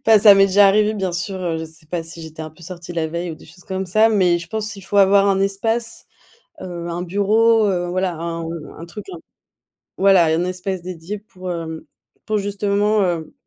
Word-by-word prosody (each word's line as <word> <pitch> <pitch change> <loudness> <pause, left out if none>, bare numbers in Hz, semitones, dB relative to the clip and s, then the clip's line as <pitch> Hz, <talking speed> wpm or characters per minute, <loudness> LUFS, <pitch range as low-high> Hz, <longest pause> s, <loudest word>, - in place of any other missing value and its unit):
Enfin 220 -1 +7
ça 205 -1 +8
m'est 195 0 +5
déjà 200 +1 +5
arrivé 210 +2 +3
bien 190 -4 -2
sûr, 185 +3 -3
heu, 170 -3 -1
je 160 - -4
sais 160 -1 -14
pas 170 +1 -3
si 165 +1 -10
j'étais 160 0 -8
un 155 - -7
peu 160 +3 -19
sortie 175 0 -8
la 165 -2 -1
veille 170 +2 -4
ou - - -6
des - - -16
choses 175 +3 -16
comme 190 -1 -4
ça, 215 +5 +4
mais 185 -5 +3
je 170 -1 -9
pense 220 +1 -3
il 195 - -11
faut 205 - -3
avoir 200 0 +5
un 195 -1 +2
espace, 225 +4 -2 0.6
heu, 175 -2 -6
un 170 +1 -3
bureau, 215 +4 +3
heu, 175 -3 0
voilà, 185 0 -1
un 165 0 -4 0.3
un 165 - -8
truc 205 +5 -9
un 355 - -7 0.8
voilà, 195 -3 +5
un 160 +2 +1
espace 185 0 -3
dédié 180 +2 -6
pour, 185 -3 -8
hem, 160 -2 -5 0.4
pour 215 -1 0
justement, 205 +1 +1
heu, 170 -4 -1
185 Hz, 220 wpm, -20 LUFS, 170-205 Hz, 0.8 s, ça